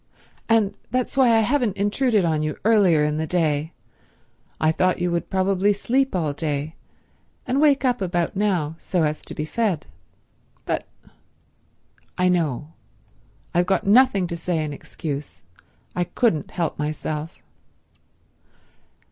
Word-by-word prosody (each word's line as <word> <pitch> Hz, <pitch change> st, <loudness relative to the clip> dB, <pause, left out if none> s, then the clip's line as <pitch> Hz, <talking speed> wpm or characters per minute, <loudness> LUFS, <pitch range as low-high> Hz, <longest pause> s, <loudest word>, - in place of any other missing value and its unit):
And 220 Hz, -3 st, +3 dB, 0.2 s
that's 255 Hz, +1 st, -1 dB
why 265 Hz, -3 st, +5 dB
I 225 Hz, -1 st, +5 dB
haven't 235 Hz, -3 st, +1 dB
intruded 205 Hz, 0 st, +2 dB
on 155 Hz, -2 st, +1 dB
you 155 Hz, -1 st, -2 dB
earlier 195 Hz, -9 st, +4 dB
in 150 Hz, 0 st, 0 dB
the 160 Hz, 0 st, -2 dB
day. 155 Hz, -2 st, 0 dB, 0.9 s
I 155 Hz, -, +3 dB
thought 185 Hz, +3 st, +1 dB
you 175 Hz, 0 st, -1 dB
would 170 Hz, 0 st, -2 dB
probably 195 Hz, +1 st, +2 dB
sleep 260 Hz, +4 st, 0 dB
all 155 Hz, -5 st, 0 dB
day, 150 Hz, 0 st, -3 dB, 0.7 s
and 260 Hz, +3 st, +1 dB
wake 285 Hz, -3 st, +4 dB
up 250 Hz, -4 st, +1 dB
about 175 Hz, -2 st, -1 dB
now 185 Hz, -7 st, 0 dB
so 180 Hz, -3 st, 0 dB
as 150 Hz, 0 st, -1 dB
to -, -, -8 dB
be 150 Hz, -, -3 dB
fed." 200 Hz, -3 st, -1 dB, 0.8 s
"But—" -, -, -2 dB, 1.3 s
"I 180 Hz, 0 st, +3 dB
know. 155 Hz, -4 st, -1 dB, 0.8 s
I've 175 Hz, +1 st, +2 dB
got 190 Hz, -, +1 dB
nothing 205 Hz, -2 st, +5 dB
to 170 Hz, -1 st, -4 dB
say 170 Hz, -1 st, -1 dB
in 150 Hz, -1 st, -4 dB
excuse. 145 Hz, 0 st, -6 dB, 0.5 s
I 180 Hz, -, 0 dB
couldn't 175 Hz, -, 0 dB
help 170 Hz, -4 st, -3 dB
myself." 155 Hz, +1 st, -3 dB
180 Hz, 140 wpm, -23 LUFS, 155-210 Hz, 1.3 s, why